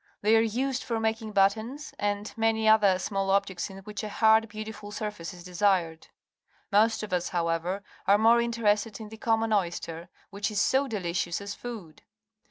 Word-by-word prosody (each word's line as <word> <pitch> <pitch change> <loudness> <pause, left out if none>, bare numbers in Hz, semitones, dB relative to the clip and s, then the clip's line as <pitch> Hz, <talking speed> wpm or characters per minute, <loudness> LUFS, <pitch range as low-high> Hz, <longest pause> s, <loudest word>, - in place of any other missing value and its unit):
They 215 +2 +5
are 225 - +5
used 255 +4 -1
for 230 -2 -2
making 220 -1 -2
buttons 220 +9 +1
and 205 0 -2
many 225 -1 +1
other 210 -4 +5
small 195 +1 -2
objects 195 -2 0
in 190 - -10
which 210 0 -6
a 215 - -4
hard, 220 +1 +4
beautiful 215 -1 -7
surface 210 -6 -5
is 175 -1 -12
desired. 180 -3 0 0.6
Most 220 +2 +3
of 210 - -5
us, 175 -1 0
however, 175 +2 -1 0.2
are 200 - +6
more 230 +2 +5
interested 225 -2 0
in 215 -1 -8
the 220 - -10
common 225 0 +1
oyster, 170 -3 -2 0.2
which 200 +2 -2
is 210 -1 -1
so 265 +6 +2
delicious 175 -6 -2
as 200 0 -6
food. 215 -11 -9
210 Hz, 175 wpm, -28 LUFS, 190-225 Hz, 0.6 s, are